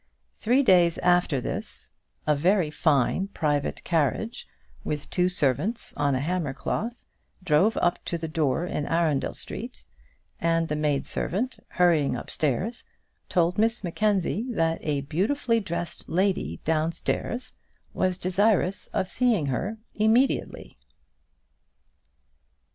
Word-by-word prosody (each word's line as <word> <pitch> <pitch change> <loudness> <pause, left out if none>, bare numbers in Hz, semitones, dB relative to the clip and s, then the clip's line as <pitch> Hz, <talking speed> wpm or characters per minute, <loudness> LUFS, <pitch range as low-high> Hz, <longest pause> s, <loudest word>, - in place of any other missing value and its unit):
Three 250 +5 +2
days 175 -7 +5
after 175 -5 +2
this, - - -5 0.3
a 150 - +3
very 175 +1 +2
fine, 155 +5 +2
private 150 -7 -1
carriage, 170 - -1 0.4
with 150 -1 -3
two 180 0 +2
servants 180 - 0
on 140 -2 +1
a - - 0
hammer 155 -2 -2
cloth, 235 - -3 0.4
drove 185 +6 +3
up 175 - +1
to 170 - -2
the 165 0 -4
door 155 0 0
in 150 -4 -3
Arundel 165 -4 +1
Street, - - -5 0.5
and 165 0 +1
the 150 - 0
maid 150 -2 0
servant, 240 +9 -2
hurrying 165 -7 +2
upstairs, 155 - -2 0.5
told 175 +2 +2
Miss 225 0 +1
Mackenzie 205 +4 0
that 165 -8 0
a 145 -2 -1
beautifully 230 - 0
dressed 175 -4 -5
lady 180 - 0
downstairs 160 +9 -1 0.4
was 185 -1 0
desirous 190 +1 +1
of 185 - -2
seeing 230 - +2
her 210 - -3 0.2
immediately. 220 - +1
175 Hz, 120 wpm, -26 LUFS, 150-205 Hz, 0.5 s, days